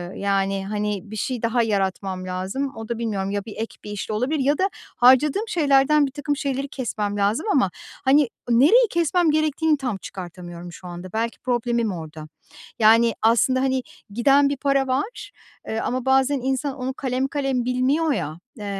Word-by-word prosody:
yani, 195 -1 0
hani, 210 -2 -2
bir - - -6
şey 245 +3 -3
daha 230 +1 +1
yaratmam 190 -3 -2
lazım. 190 +10 -3
O 225 0 -8
da 235 - -2
bilmiyorum, 200 -4 -2
ya 205 -1 -3
bir 220 - -8
ek 225 +1 -5
bir 210 - -7
işle 205 +1 -4
olabilir 265 +8 0
ya 285 +2 +2
da 385 +1 +1 0.3
harcadığım 275 - +4
şeylerden 290 -5 +3
birtakım 290 +1 -3
şeyleri 275 -1 -2
kesmem 210 -6 -3
lazım 205 - +1
ama, 250 - +3 0.4
hani, 275 -1 +4 0.2
nereyi 315 - +5
kesmem 340 -1 +2
gerektiğini 310 0 +1
tam 250 -7 -3
çıkartamıyorum 175 -2 -9
şu 180 +2 -11
anda. 175 +2 -8
Belki 230 +1 -2
problemim 240 -3 0
orada. 155 -2 -8 0.5
Yani, 225 +2 +5
aslında, 235 +4 +3
hani, 260 -1 0 0.3
giden 275 +6 +4
bir 285 - -2
para 275 -1 +1
var, 410 - -3 0.4
eee, 220 - -2
ama 255 +2 -2
bazen 265 +1 +3
insan 265 +1 -1
onu 260 +1 -3
kalem 260 0 -1
kalem 270 -4 -1
bilmiyor 270 +6 +1
ya, 155 - -4 0.2
eee, 205 - -7
250 Hz, 170 wpm, -23 LUFS, 205-275 Hz, 0.5 s, nereyi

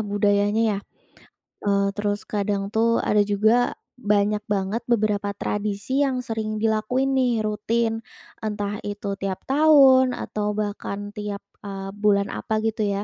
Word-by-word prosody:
budayanya, 205 +1 +2
ya? - - -3 0.9
Eee, 200 0 +3
terus, 205 0 -2
kadang 200 -1 -2
tuh, 230 +1 +2
ada 210 - +2
juga 215 +4 +2 0.2
banyak 210 -1 +1
banget 205 +2 -1
beberapa 210 -3 0
tradisi 210 +6 -2
yang 255 -2 -1
sering 220 -2 -3
dilakuin 225 +5 +1
nih, 245 -4 +2
rutin. 225 +2 0 0.4
Entah 210 -1 -3
itu 205 0 -4
tiap 195 -1 -3
tahun, 270 -3 +5
atau 210 0 -3
bahkan 205 -1 -4
tiap, 210 -1 -5 0.2
eee, 195 -1 -6
bulan 205 -1 +2
apa, 215 0 -2
gitu 220 -1 0
ya. 200 0 -1
210 Hz, 135 wpm, -24 LUFS, 205-225 Hz, 0.9 s, tahun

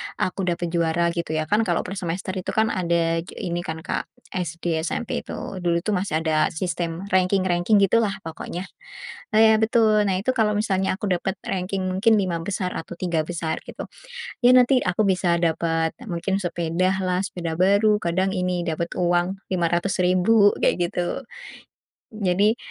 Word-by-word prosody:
aku 185 0 -2
dapet 170 -1 -1
juara, 170 0 +1
gitu 170 -2 -3
ya, 155 - +1
kan, 210 +7 +1
kalau - - +1
per 195 +1 -5
semester 180 +2 -3
itu 185 -1 -4
kan, 220 0 +2
ada 170 -2 +1
j 165 - -8
ini 175 -4 -3
kan, 160 -1 -5
Kak, - - -3 0.2
SD, 170 -2 -2
SMP, 175 +7 -2
itu. - - -8 0.2
Dulu 170 0 0
itu 215 - -1
masih 180 -5 -1
ada 155 -1 +2
sistem 170 0 -3
ranking-ranking 185 +1 +2
gitu, 230 +4 +4
lah, 205 -3 0
pokoknya. 165 +2 -6 0.7
Nah, - - +6
ya 220 0 +5
betul. 220 -1 +3
Nah, 190 - +1
itu 255 +6 0
kalau 220 -4 +1
misalnya 190 -3 0
aku 200 0 -3
dapat 185 +1 -1
ranking 190 +1 -2
mungkin 215 +4 +3
lima 185 -5 0
besar 180 0 -3
atau 170 +1 -7
tiga 175 -3 -1
besar 165 -2 -3
gitu - - -7 0.6
ya, 250 +1 +7
nanti 255 +1 +5
aku 185 +3 +1
bisa 180 -2 +2
dapat 165 -1 +1 0.2
mungkin 190 +2 -1
sepeda 180 +1 -1
lah, 180 0 0
sepeda 170 -3 -5
baru, 205 +3 +4
kadang 185 +2 0
ini, 180 -2 -1
dapat 170 +1 -3
uang 175 +2 +1
Rp500.000 185 +4 +3
kayak 175 -1 +2
gitu. 175 +11 -3 0.9
Jadi 205 +3 +2
180 Hz, 165 wpm, -23 LUFS, 170-195 Hz, 0.9 s, ya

